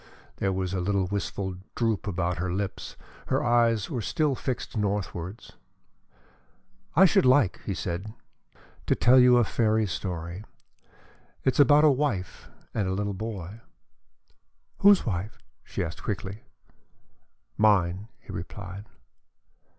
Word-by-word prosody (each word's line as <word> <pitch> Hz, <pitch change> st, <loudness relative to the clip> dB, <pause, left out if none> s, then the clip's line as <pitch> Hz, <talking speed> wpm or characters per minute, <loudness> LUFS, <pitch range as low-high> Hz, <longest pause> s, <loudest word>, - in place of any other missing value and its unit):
There 95 Hz, -, 0 dB
was 95 Hz, -1 st, -2 dB
a 95 Hz, -, -1 dB
little 100 Hz, +1 st, +1 dB
wistful 95 Hz, -1 st, -3 dB, 0.2 s
droop 115 Hz, -4 st, 0 dB
about 90 Hz, -1 st, -1 dB
her 90 Hz, 0 st, -2 dB
lips; 95 Hz, +1 st, -4 dB, 0.3 s
her -, -, +1 dB
eyes 115 Hz, -3 st, +2 dB
were 120 Hz, -, -3 dB
still 150 Hz, +5 st, 0 dB
fixed 130 Hz, -1 st, -4 dB
northwards. 100 Hz, -2 st, -3 dB, 1.4 s
"I 190 Hz, +5 st, +8 dB
should 175 Hz, -, +4 dB
like," 130 Hz, -6 st, +3 dB
he 100 Hz, -, -1 dB
said, 90 Hz, +7 st, -4 dB, 0.8 s
"to -, -, +3 dB
tell 130 Hz, +2 st, +6 dB
you 125 Hz, -1 st, +6 dB
a 120 Hz, -, +5 dB
fairy 110 Hz, 0 st, +1 dB
story. 85 Hz, 0 st, -5 dB, 1.0 s
It 130 Hz, -, +2 dB
is -, -, -4 dB
about 145 Hz, +2 st, +6 dB
a 155 Hz, -, +7 dB
wife 125 Hz, -10 st, -2 dB, 0.2 s
and 105 Hz, -4 st, -1 dB
a 95 Hz, -, -1 dB
little 100 Hz, 0 st, -2 dB
boy." 105 Hz, 0 st, -6 dB, 1.2 s
"Whose 200 Hz, -1 st, +6 dB
wife?" 105 Hz, +3 st, -3 dB, 0.3 s
she -, -, -3 dB
asked 85 Hz, -1 st, -6 dB
quickly. 100 Hz, 0 st, -5 dB, 1.1 s
"Mine," 100 Hz, -2 st, +2 dB
he -, -, -11 dB
replied. 90 Hz, +3 st, -7 dB
100 Hz, 130 wpm, -27 LUFS, 95-120 Hz, 1.4 s, I